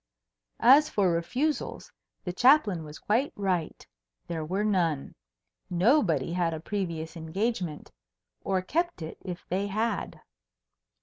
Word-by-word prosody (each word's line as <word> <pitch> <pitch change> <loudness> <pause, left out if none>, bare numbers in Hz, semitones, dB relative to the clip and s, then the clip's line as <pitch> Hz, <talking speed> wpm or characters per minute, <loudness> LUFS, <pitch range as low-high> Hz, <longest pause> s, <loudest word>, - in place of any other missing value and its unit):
As 285 +5 +7
for 195 -4 +2
refusals, 250 - -2 0.3
the 180 - -4
Chaplain 220 - +4
was 150 0 -9
quite 240 +7 0
right. 185 -5 -2 0.4
There 165 -2 -4
were 190 +6 -1
none. 170 -9 0 0.6
Nobody 175 - +2
had 170 -2 0
a - - -5
previous 170 -3 -4
engagement 170 0 -3 0.5
or 190 -2 0
kept 340 - -1
it, 160 - -8
if 180 -1 -6
they 195 +3 0
had. 215 +1 -2
185 Hz, 120 wpm, -28 LUFS, 165-220 Hz, 0.6 s, As